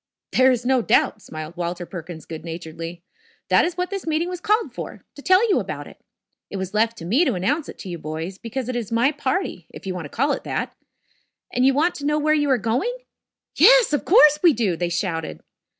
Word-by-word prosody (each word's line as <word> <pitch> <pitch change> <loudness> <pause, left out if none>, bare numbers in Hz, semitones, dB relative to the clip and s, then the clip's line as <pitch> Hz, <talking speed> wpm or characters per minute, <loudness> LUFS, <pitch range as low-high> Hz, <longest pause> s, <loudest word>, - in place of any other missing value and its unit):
"There 260 +1 +5
is 245 -1 -1
no 260 -1 +3
doubt," 215 - +2
smiled 155 -1 -8
Walter 175 0 -3
Perkins 170 -2 -8
good 160 -1 -8
naturedly. 165 +1 -7 0.5
"That - - +5
is 345 0 -3
what 360 +1 -2
this 390 -4 -5
meeting 320 +2 0
was 360 -1 -6
called 430 +4 +1
for - - -7
to 285 - -11
tell 375 +8 +4
you 405 - +3
about - - -5
it. - - -15 0.5
It 200 - -5
was 190 0 -4
left 225 +2 +1
to 165 - -8
me 240 - +3
to 260 - +1
announce 280 - -1
it - - -9
to - - -9
you 170 -1 -5
boys, 160 +5 -5
because 240 +2 -5
it 255 - -3
is 235 -3 -4
my 235 +5 +3
party, 285 - -2
if - - -12
you 190 - -2
want 180 -3 -5
to - - -8
call 280 - 0
it 275 - -2
that. - - -3 0.8
And 250 +1 +3
you 270 - +3
want 330 +5 +2
to 285 - -6
know 300 0 +2
where 305 +1 +2
you 295 -2 +1
are 260 - +4
going?" 250 - -1 0.6
"Yes, - - +6
of 295 - +1
course 300 -7 +6
we 345 -4 +6
do," 215 -7 0
they 175 +1 -2
shouted. 170 -2 -3
240 Hz, 230 wpm, -22 LUFS, -, 0.8 s, Yes